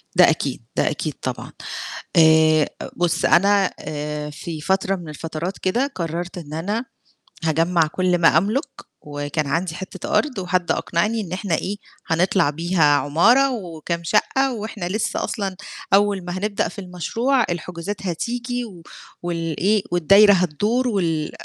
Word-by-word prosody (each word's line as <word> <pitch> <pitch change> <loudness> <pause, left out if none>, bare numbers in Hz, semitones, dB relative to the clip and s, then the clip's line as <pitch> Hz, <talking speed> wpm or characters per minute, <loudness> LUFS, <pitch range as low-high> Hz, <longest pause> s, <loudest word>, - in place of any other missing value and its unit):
ده - - +7
أكيد، - - -2
ده - - +2
أكيد - - -3
طبعًا، - - -4 0.7
آآ، 160 -1 +5 0.3
بُص 175 -1 +1
أنا 200 +1 +4
آآ 150 0 -4
في 155 +1 -7
فترة 190 +3 +1
من 175 -4 -8
الفترات 165 +4 -5
كده، 235 +9 0
قررت 170 +1 -4
إن 155 -4 -8
أنا 205 +10 -2 0.6
هاجمّع 165 +1 +2
كل 180 +2 +1
ما 165 -2 +5
أملك، 215 - 0 0.4
وكان 145 +1 -3
عندي 165 +4 -1
حتة 185 0 -4
أرض 275 -8 -2
وحد 180 -1 -1
أقنعني 210 +7 0
إن 185 -5 -6
إحنا 185 -2 -1
إيه 195 +5 -2 0.3
هنطلع 170 -1 +2
بيها 165 +2 +1
عمارة 225 - +4
وكام 170 -5 -4
شقة 260 +8 +2
وإحنا 210 -4 -5
لسه 210 +4 -1
أصلًا 195 -4 -3 0.4
أول 200 -2 +3
ما 175 +1 -4
هنبدأ 205 +1 -1
في 205 - -8
المشروع 225 - 0
الحجوزات 175 +3 -5
هتيجي 245 +7 -2
و 185 -7 -11 0.4
والإيه 175 +4 0
والدايرة 195 +5 +6
هتدور 205 - +1
وال 165 -8 0
180 Hz, 140 wpm, -22 LUFS, 165-205 Hz, 0.7 s, ده